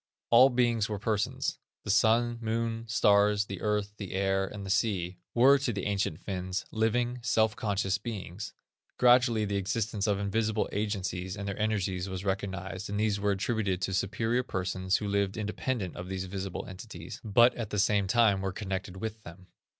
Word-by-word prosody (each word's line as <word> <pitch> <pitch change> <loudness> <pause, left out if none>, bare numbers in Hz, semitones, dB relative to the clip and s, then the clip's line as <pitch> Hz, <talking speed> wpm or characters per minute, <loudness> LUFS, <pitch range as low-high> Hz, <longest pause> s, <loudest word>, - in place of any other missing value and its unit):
All 125 +3 +8
beings 120 -4 +1
were 105 - -2
persons. 105 0 -1 0.2
The - - -1
Sun, 115 +3 +3
Moon, 115 0 -2
Stars, 105 -1 +4
the 100 -2 -7
Earth, 105 -1 0
the 100 -4 -6
Air, 95 0 +1
and 100 0 -7
the 95 - -3
Sea, 95 -5 0 0.2
were 135 +4 +6
to 135 -3 -1
the 100 -4 -4
ancient 100 -5 -1
Finns, 95 -1 -4
living, 120 +3 0
self 110 -1 +2
conscious 100 -3 0
beings. 105 -4 -6 0.4
Gradually 120 -3 +5
the 100 0 -1
existence 100 +2 -1
of 100 -2 +2
invisible 105 +2 0
agencies 95 -2 -2
and 100 0 -5
energies 100 -3 -1
was 95 +1 -5
recognized, 95 0 -3
and 100 0 -2
these 105 -2 +1
were 105 0 +1
attributed 100 -1 0
to 95 - -1
superior 110 +6 0
persons 95 -4 -1
who 105 - -4
lived 100 0 0
independent 105 -1 -3
of 90 +1 -7
these 95 0 -3
visible 95 0 -5
entities, 90 -3 -9
but 120 +3 +5
at 115 -4 -5
the 105 - -3
same 100 -1 +2
time 100 -2 +4
were 95 0 -1
connected 95 -1 -4
with 110 +2 -5
them. 90 0 -12
100 Hz, 175 wpm, -29 LUFS, 95-110 Hz, 0.4 s, All